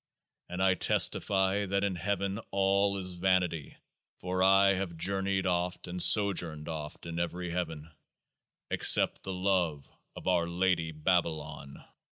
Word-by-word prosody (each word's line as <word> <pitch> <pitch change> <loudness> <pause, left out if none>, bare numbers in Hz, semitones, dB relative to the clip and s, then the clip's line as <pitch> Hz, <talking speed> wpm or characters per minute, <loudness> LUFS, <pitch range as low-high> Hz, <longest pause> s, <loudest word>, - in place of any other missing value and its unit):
And 90 +1 -3
I 95 -1 +4
testify 95 +2 +2
that 100 +1 -1
in 100 -1 0
heaven 100 +3 -3
all 100 +1 +1
is 95 -1 -4
vanity 90 -4 -1 0.4
(for 90 0 -3
I 95 +1 +5
have 95 -3 -4
journeyed 95 +2 -1
oft, 90 0 -2
and 90 0 -3
sojourned 85 -5 +3
oft, 75 -2 -7
in 85 0 -5
every 85 +1 -4
heaven), 80 -3 -5 0.8
except - - +4
the 95 - -6
love 90 -6 -1 0.3
of - - -9
OUR 90 -2 +1
LADY 85 -2 0
BABALON. 80 -4 -2
90 Hz, 135 wpm, -29 LUFS, 85-95 Hz, 0.8 s, I